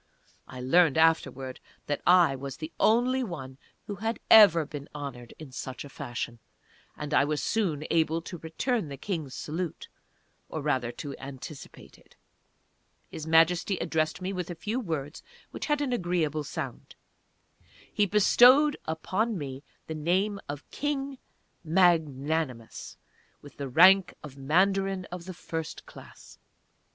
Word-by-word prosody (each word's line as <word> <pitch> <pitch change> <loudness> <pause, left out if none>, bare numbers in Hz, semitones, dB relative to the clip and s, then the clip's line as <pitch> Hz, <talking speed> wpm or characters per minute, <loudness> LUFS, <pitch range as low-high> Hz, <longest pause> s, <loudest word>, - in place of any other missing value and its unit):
_ - - -41 0.4
(I 130 - -9
learned 155 +4 +4
afterwards 135 -5 +1 0.3
that 145 - -2
I 175 -6 +6
was 135 0 -7
the 155 +1 -7
only 250 +4 +3
one 135 - -7 0.3
who 205 - -6
had 225 +3 -2
ever 180 -8 +8
been 145 -1 -8
honoured 130 -5 -7
in 155 -4 -11
such 130 0 -6
fashion. 120 -4 -6 0.6
And 150 0 -5
I - - +5
was 150 +1 -1
soon 170 -10 -1
able 160 0 +2
to 175 0 -8
return 190 - -2
the 140 - -7
King's 155 -5 -4
salute, 165 +2 -5 0.6
or 160 - -4
rather 130 -5 0
to 140 +2 -7
anticipate 135 +2 -10
it.) - - -25 1.0
His 155 - -7
Majesty 165 +4 +3
addressed 160 +3 -1
me 190 +2 -2
with 180 -2 -4
a 175 - -5
few 215 +9 -3
words 160 - -4 0.3
which - - -5
had 295 -1 +1
an 270 -4 -1
agreeable 170 - -1
sound. 145 - -7 1.0
He 205 -2 +2
bestowed 250 +8 +6
on 190 +7 -1
me 135 -3 -6 0.2
the 160 - -5
name 185 +6 0
of 145 0 -6
"King 280 -2 -3 0.4
Magnanimous" 155 -7 0 0.5
with 145 - -14
the 140 -2 -5
rank 180 +6 +6
of 145 -3 -9
Mandarin 190 +6 +1
of 175 -1 -7
the 185 - -7
First 160 -2 -6
Class. - - -14
160 Hz, 145 wpm, -28 LUFS, 145-195 Hz, 1.0 s, ever